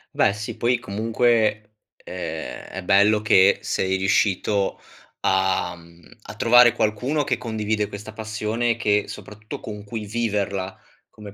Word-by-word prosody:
Beh - - +4
sì, 110 +2 -6
poi 125 +1 +2
comunque, 110 0 0 0.2
ehm, 80 -3 -7
è 95 - -7
bello 100 +3 +4
che 95 -2 +5
sei 95 0 0
riuscito 100 +1 +1 0.4
a 95 0 +1
mhmm, 85 0 -18
a - - -10
trovare 120 0 +6
qualcuno 125 +8 0
che 125 -3 -1
condivide 110 -3 -2
questa 105 +2 -9
passione, 110 +2 -2
che 105 -2 +1
soprattutto 105 +1 -9
con 105 -1 -8
cui 105 0 -6
viverla 100 -4 -2 0.3
come 105 -2 -12
105 Hz, 130 wpm, -23 LUFS, 100-110 Hz, 0.4 s, trovare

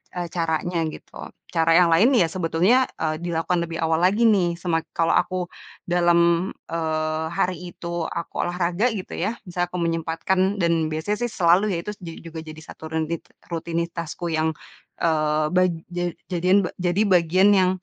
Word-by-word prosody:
eee, 175 -1 -3
caranya 165 0 -1
gitu, - - -10 0.3
cara 165 0 +3
yang 180 -1 +6
lain 225 +11 +5
ya, 175 - +5
sebetulnya, 185 +9 +2
eee, 155 0 -1
dilakukan 170 0 0
lebih 165 -1 -6
awal 160 0 +2
lagi 200 +6 +3
nih, 180 -6 +2
semak 165 -2 0
kalau 165 -1 +3
aku 180 -1 0 0.4
dalam, 175 0 +3 0.2
eee, 155 -1 -1
hari 180 0 0
itu, 170 -1 -4
aku 170 - -5
olahraga 175 +5 0
gitu, 190 - -6
ya, 210 +7 -2
misalnya 175 0 -1
aku 180 - -3
menyempatkan, 165 +2 -1 0.2
dan 165 -2 +2
biasanya 170 +7 -2
sih 240 - -4
selalu 185 +3 +3
ya, - - -1
itu, 210 - -3
ju 170 -2 -7 0.2
juga 165 0 -7
jadi 155 0 -9
satu 160 - -13
rutit 160 +1 -2 0.3
rutinitasku, 170 0 -3
yang, 160 0 +1 0.5
eee, 155 -2 +1
bag 185 0 +4 0.2
ja 175 0 -1 0.3
jadian 185 +3 +3
ba - - -7
jadi 180 +2 +1
bagian, 185 +1 +4
yang 185 -1 +4
170 Hz, 165 wpm, -23 LUFS, 165-180 Hz, 0.5 s, yang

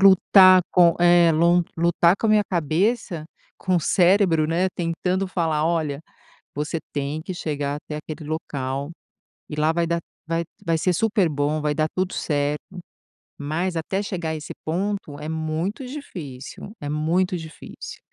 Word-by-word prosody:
lutar 190 -1 +7
com 175 -2 +6
é 175 -1 +6
lon 170 +2 +4
lutar 170 +2 +3
com - - 0
a - - +4
minha 210 -1 +5
cabeça, 175 - 0 0.3
com 185 -1 +1
o 170 - +2
cérebro, 175 -3 +3
né, 175 +3 +1
tentando 180 +3 -1
falar: 160 -4 0
"Olha, 155 -4 -1 0.6
você 150 +3 -2 0.2
tem 145 +2 -2
que 185 - -5
chegar 145 -4 -3
até 150 - -6
aquele 155 0 -8
local, 140 -2 -3 0.6
e 150 - -5
lá 155 +1 +2
vai 170 0 0
dar 170 0 +1 0.3
vai 165 0 0 0.2
vai 165 -2 +1
ser 180 +2 +1
super 205 -2 +2
bom, 150 +1 -1
vai 150 -1 0
dar 155 +1 +1
tudo 185 0 -1
certo". 145 -1 -1 0.8
Mas 165 +5 -2
até 190 +5 -2
chegar 175 -5 -3
a - - -2
esse 150 - -7
ponto 180 -3 -2
é 150 - -6
muito 160 - -3
difícil, 175 - -8
é 145 - -5
muito 170 +5 +1
difícil. 160 -1 -9
165 Hz, 160 wpm, -23 LUFS, 150-185 Hz, 0.8 s, lutar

